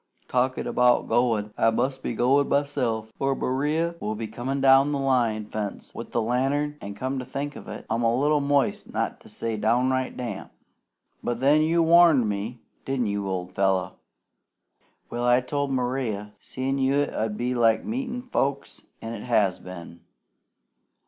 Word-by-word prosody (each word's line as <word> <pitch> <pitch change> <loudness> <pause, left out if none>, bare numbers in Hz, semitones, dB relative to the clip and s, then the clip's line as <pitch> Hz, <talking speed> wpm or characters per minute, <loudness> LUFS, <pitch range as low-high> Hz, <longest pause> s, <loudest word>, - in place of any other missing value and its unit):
Talkin' 130 +1 0
'bout 125 0 +3
goin', 110 -4 +1
I 115 - +5
must 130 +4 -1
be 120 - -3
goin' 135 +5 +3
myself, 120 -6 -1
or 135 0 +1
Maria 150 +7 0
will 110 -6 -3
be 110 +1 -4
comin' 125 +5 -3
down 135 +1 +5
the 145 - 0
line 120 -6 +1
fence 105 -1 -5
with 115 - -7
the 115 - 0
lantern; 135 +5 0
an', 100 0 -7
come 130 +5 -3
to - - -4
think 145 +3 -4
of - - -10
it, - - -8
I'm 115 +1 -1
a 115 0 +2
little 145 +3 +2
moist, 140 -2 0
not - - -2
to - - -17
say 115 -1 -3
downright 125 +4 +1
damp. 115 -6 -5 0.7
But 120 -1 -2
then 145 +4 +4
you 165 +2 +3
WARNED 165 -7 +6
me, 105 +4 -3 0.3
didn't 135 -3 -1
you, 100 -1 -2
old 90 -1 -3
fellow? 95 -1 0 1.1
Well, 120 +1 -2
I 125 0 +5
told 140 +2 -2
Maria 125 -5 -2
seein' 135 +1 -3
you 135 +2 +2
'ud 110 -6 -3
be 125 +1 -1
like 115 -2 +3
meetin' 245 +1 -3
folks, 140 - -2 0.2
an' 115 +1 -5
it 110 0 -7
has 105 -6 +2
been. 85 -2 -10
125 Hz, 170 wpm, -25 LUFS, 110-140 Hz, 1.1 s, WARNED